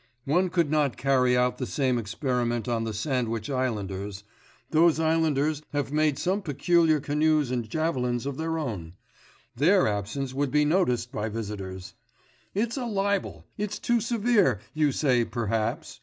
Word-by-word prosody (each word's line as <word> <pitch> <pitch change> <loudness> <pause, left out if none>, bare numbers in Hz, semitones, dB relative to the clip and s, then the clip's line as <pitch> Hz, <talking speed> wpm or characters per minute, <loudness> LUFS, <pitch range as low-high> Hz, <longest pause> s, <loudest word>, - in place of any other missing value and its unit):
One 180 +6 +2
could 170 -4 +1
not 150 -4 +1
carry 130 -2 +3
out 125 0 +1
the 125 - -2
same 130 -5 0
experiment 120 +1 -2
on 115 -2 0
the 110 - -2
Sandwich 115 0 -2
islanders; 100 -6 -3 0.5
those 160 0 +4
islanders 155 -2 +1
have 145 -1 -1
made 155 -2 +2
some 190 +3 0
peculiar 160 0 +2
canoes 150 -1 +1
and 120 -3 -2
javelins 125 -5 -1
of 140 -1 -3
their 160 0 -2
own; 100 - -4 0.6
their 175 - +4
absence 110 +6 -3
would 140 +1 0
be 150 +2 +3
noticed 125 -8 +1
by 105 +1 -3
visitors. 100 -4 -6 0.6
It's 230 +5 0
a 255 - -2
libel! 200 -2 -1
it's 210 0 -2
too 240 -1 +1
severe, 220 - +2
you 155 -2 +2
say 130 -4 +2
perhaps.... 115 -2 -2
135 Hz, 150 wpm, -27 LUFS, 120-160 Hz, 0.6 s, those